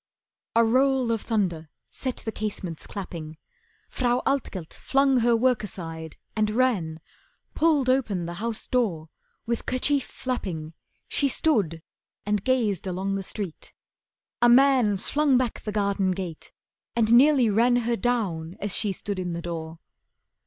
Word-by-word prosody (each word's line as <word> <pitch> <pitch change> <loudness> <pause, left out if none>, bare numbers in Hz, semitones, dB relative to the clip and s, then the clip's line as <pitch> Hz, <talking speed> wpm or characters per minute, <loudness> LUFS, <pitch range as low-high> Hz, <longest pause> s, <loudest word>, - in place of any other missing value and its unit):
A 230 0 +5
roll 260 +1 +3
of 225 -2 0
thunder 175 -8 -1 0.2
set 255 -2 -4
the 220 - -5
casements 200 -6 -5
clapping. 165 -5 -7 0.5
Frau 245 -1 0
Altgelt 205 - -2
flung 270 -1 +2
her 235 0 +3
work 245 -1 +2
aside 165 -6 -7 0.2
and 215 -1 +1
ran, 210 -10 +1 0.5
Pulled 300 -5 +2
open 225 -9 +1
the 170 - -5
house 230 -1 -3
door, 185 -11 0 0.4
with 235 0 -3
kerchief 270 +2 +2
flapping 175 -11 -4 0.3
She 285 - +1
stood 200 - +1 0.4
and 205 -1 0
gazed 225 -8 +1
along 190 +2 -2
the 195 - -1
street. 195 -3 -6 0.7
A 240 - +6
man 250 -5 +5
Flung 285 +6 +2
back 250 -3 -1
the 210 - -4
garden 200 -2 +1
gate 180 -4 -6 0.4
and 230 -1 +3
nearly 265 0 +6
ran 235 +4 +4
Her 240 -1 +1
down 195 -9 -1
as 200 -1 0
she 205 -3 +1
stood 200 +1 -4
in 180 -2 -3
the 170 - -4
door. 165 -1 -5
215 Hz, 145 wpm, -26 LUFS, 180-250 Hz, 0.7 s, A